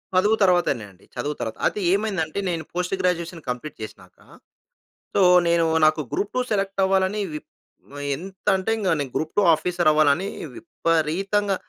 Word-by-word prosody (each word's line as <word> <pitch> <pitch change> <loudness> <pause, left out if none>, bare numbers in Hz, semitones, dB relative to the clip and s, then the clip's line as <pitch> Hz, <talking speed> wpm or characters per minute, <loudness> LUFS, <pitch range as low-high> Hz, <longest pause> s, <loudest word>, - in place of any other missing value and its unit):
చదువు 205 +4 +4
తర్వాతనే 175 - +2
అండి. 95 - -23
చదువు 150 0 -3
తరువాత. 110 - -4
అయితే 210 - 0
ఏమైందంటే 195 -5 -1
నేను 165 -2 -2
పోస్ట్ 180 +2 -1
గ్రాడ్యుయేషన్ 170 -2 -1
కంప్లీట్ 125 +5 -5
చేసినాక 110 - -11 1.0
సో, 200 - +4 0.3
నేను 170 -1 +3 0.2
నాకు 155 0 +3
గ్రూప్-2 210 +5 -1
సెలెక్ట్ 195 -1 -1
అవ్వాలని 190 +2 +1
విప్ 150 - -8 0.5
ఆహ్, 145 - -5
ఎంత 190 +5 -11
అంటే, 190 +4 -2
ఇంక 205 -4 -2
నేను 135 -3 -3
గ్రూప్-2 160 +6 0
ఆఫీసర్ 175 +1 +1
అవ్వాలని 155 +4 +3 0.3
విపరీతంగా, 175 - 0
175 Hz, 145 wpm, -23 LUFS, 155-195 Hz, 1.0 s, చదువు